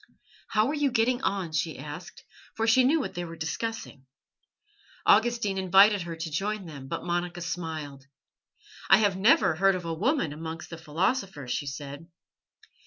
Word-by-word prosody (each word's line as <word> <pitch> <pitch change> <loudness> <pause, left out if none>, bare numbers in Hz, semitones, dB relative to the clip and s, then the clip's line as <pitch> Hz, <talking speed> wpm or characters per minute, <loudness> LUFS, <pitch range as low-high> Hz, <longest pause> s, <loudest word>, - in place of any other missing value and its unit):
"How 215 0 +2
are - - -1
you 290 -2 +1
getting 245 +1 +1
on?" 190 -8 -1
she 155 +1 -2
asked, 150 +5 -9 0.3
for 225 - 0
she 230 +3 +5
knew 295 +6 +3
what 190 -9 -4
they 175 -1 -4
were 165 -1 -7
discussing. 160 - -5 1.0
Augustine 220 -4 +3
invited 195 +2 +5
her 170 -1 -5
to 165 0 -5
join 200 +5 -2
them, 140 -5 -9
but - - -4
Monica 175 0 -2
smiled. 155 -5 -5 0.8
"I - - +8
have 205 -3 +2
never 215 - +4
heard 195 +4 +3
of 180 -2 -5
a 165 - -2
woman 205 - 0
amongst 160 +2 -7
the 165 - -6
philosophers," 170 - -2
she 145 - -2
said. 140 +3 -7
175 Hz, 165 wpm, -27 LUFS, 160-215 Hz, 1.0 s, I